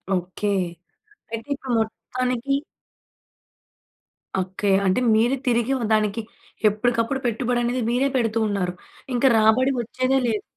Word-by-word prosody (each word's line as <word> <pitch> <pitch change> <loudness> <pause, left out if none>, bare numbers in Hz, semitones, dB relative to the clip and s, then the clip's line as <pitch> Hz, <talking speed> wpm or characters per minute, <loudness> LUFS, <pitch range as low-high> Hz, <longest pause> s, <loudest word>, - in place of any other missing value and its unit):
Okay. 185 +3 -3 0.9
అయితే, 230 +5 -5
ఇప్పుడు 265 -2 -5
మొత్తానికి 250 +4 -2 1.9
అక్కయ్య. 190 +1 +1
అంటే, 185 +6 +2 0.2
మీరే 235 +5 +3
తిరిగి 240 +1 +2
ఆహ్, 235 - -2
దానికి 215 +1 +1 0.5
ఎప్పుడుకప్పుడు 235 +4 0
పెట్టుబడనేది 240 +1 0
మీరే 255 +3 +2
పెడుతూ 230 -2 +1
ఉన్నారు. 190 -3 -1 0.4
ఇంక 245 +2 -1
రాబడి 225 +5 +4
ఒచ్చేదే 255 +3 0
లేదు. 220 -3 -1
235 Hz, 110 wpm, -23 LUFS, 215-250 Hz, 1.9 s, రాబడి